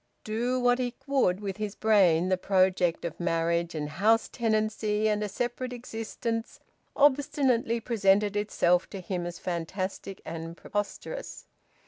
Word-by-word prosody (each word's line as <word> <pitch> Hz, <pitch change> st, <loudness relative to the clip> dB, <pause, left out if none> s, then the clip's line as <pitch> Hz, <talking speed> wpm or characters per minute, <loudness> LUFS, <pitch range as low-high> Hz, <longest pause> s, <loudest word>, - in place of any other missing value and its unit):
Do 240 Hz, +4 st, -1 dB
what 245 Hz, 0 st, +3 dB
he 245 Hz, -1 st, -2 dB
would 260 Hz, -9 st, +2 dB
with 195 Hz, -1 st, -4 dB
his 210 Hz, -1 st, -4 dB
brain, 185 Hz, -6 st, +4 dB
the 185 Hz, -, +4 dB
project 185 Hz, -2 st, +2 dB
of 165 Hz, -, -5 dB
marriage 170 Hz, 0 st, 0 dB
and 150 Hz, -1 st, -2 dB
house 215 Hz, +8 st, +2 dB
tenancy 215 Hz, -2 st, 0 dB
and 210 Hz, 0 st, +1 dB
a 210 Hz, -, -2 dB
separate 245 Hz, +4 st, -3 dB
existence 230 Hz, -1 st, -4 dB, 0.4 s
obstinately 265 Hz, -4 st, +3 dB
presented 205 Hz, -3 st, +2 dB
itself 180 Hz, -4 st, +2 dB
to 195 Hz, -, -6 dB
him 180 Hz, -1 st, -3 dB
as 175 Hz, 0 st, -6 dB
fantastic 185 Hz, +2 st, -4 dB
and 165 Hz, 0 st, -6 dB
preposterous. 205 Hz, -, -5 dB
210 Hz, 135 wpm, -28 LUFS, 180-230 Hz, 0.4 s, brain